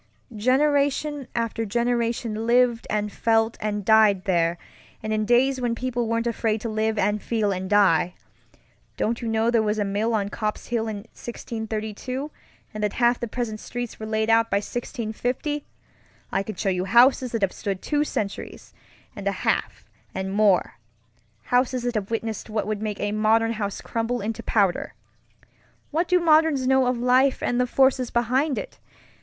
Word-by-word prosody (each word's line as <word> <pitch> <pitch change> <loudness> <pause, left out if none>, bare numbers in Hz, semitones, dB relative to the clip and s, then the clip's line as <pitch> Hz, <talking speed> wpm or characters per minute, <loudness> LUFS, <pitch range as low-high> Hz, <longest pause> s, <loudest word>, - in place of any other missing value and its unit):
Generation 280 +3 +1
after 230 -1 -1
generation 235 0 -1
lived 240 -1 +3
and 210 -1 -1
felt 225 +1 +1
and 210 -2 -2
died 215 -3 +5
there, 170 -3 +1 0.5
and 215 0 -2
in 215 0 0
days 255 +3 +3
when 240 -1 0
people 245 -1 -2
weren't 230 +1 0
afraid 225 -2 0
to 230 - -3
live 220 0 0
and 210 0 +1
feel 220 -3 0
and 185 0 -3
die. 185 -4 +3 0.8
Don't 230 +3 -1
you 235 - -3
know 225 +1 +1
there 230 -2 +3
was 210 0 0
a 205 - 0
mill 210 +4 0
on 200 -2 -1
Copp's 210 0 -4
Hill 230 -2 -1
in 210 -2 -4
1632, 230 +4 -5 0.4
and 215 0 -4
that 210 - 0
half 240 0 +2
the 240 - -3
present 220 -2 -4
streets 245 0 -6
were 220 - -5
laid 220 0 0
out 230 0 +4
by 200 - +2
1650? 245 +6 -3 0.7
I - - +1
can 210 +2 -6
show 200 - -1
you 180 -1 -1
houses 245 +4 +4
that 230 -3 -1
have 190 - +1
stood 195 -2 -4
two 295 -1 +1
centuries 210 -8 -5 0.4
and - - -5
a - - +3
half - - -1 0.3
and 190 0 -3
more; 200 - +2 0.7
houses 250 0 +2
that 245 0 -1
have 210 -3 -2
witnessed 225 -1 -3
what 215 0 -1
would 215 -1 -3
make 210 -2 -3
a 205 - -1
modern 220 +2 +2
house 205 -3 -4
crumble 230 +2 -2
into 215 +2 -4
powder. 200 -5 0 1.0
What 330 +4 0
do 360 +1 +4
moderns 315 -5 +4
know 265 -1 +3
of 250 0 +1
life 255 +2 +3
and 245 0 +1
the 250 - +1
forces 265 -1 +2
behind 255 +5 +1
it? - - -6
225 Hz, 170 wpm, -24 LUFS, 210-245 Hz, 1.0 s, died